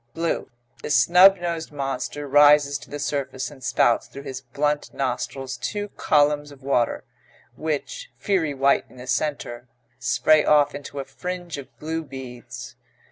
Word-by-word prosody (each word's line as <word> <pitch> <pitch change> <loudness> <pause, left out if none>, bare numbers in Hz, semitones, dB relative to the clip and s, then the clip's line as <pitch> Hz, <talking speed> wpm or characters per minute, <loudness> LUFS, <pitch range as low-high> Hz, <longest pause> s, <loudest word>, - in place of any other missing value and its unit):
BLUE 165 -4 -1 0.3
The - - -5
snub 180 +6 +7
nosed 170 -2 -4
monster 140 +1 -4
rises 145 0 +5
to - - -14
the 145 - -5
surface 140 -2 -3
and 135 -3 -14
spouts 120 -1 +2
through 140 - -10
his 135 -2 -6
blunt 145 +4 -1
nostrils 135 0 -3
two 205 - -3
columns 145 -2 +2
of 140 -1 -15
water, 125 -4 +1 0.5
which, 160 - -4
fiery 165 -8 0
white 135 +1 +3
in - - -17
the 125 - -9
centre, 130 -3 -2 0.3
spray 155 -1 +4
off 145 -1 +4
into 145 0 -8
a 135 - -4
fringe 175 +3 -6
of 135 - -9
blue 160 +1 -3
beads. 130 -4 -9
145 Hz, 150 wpm, -24 LUFS, 135-155 Hz, 0.5 s, snub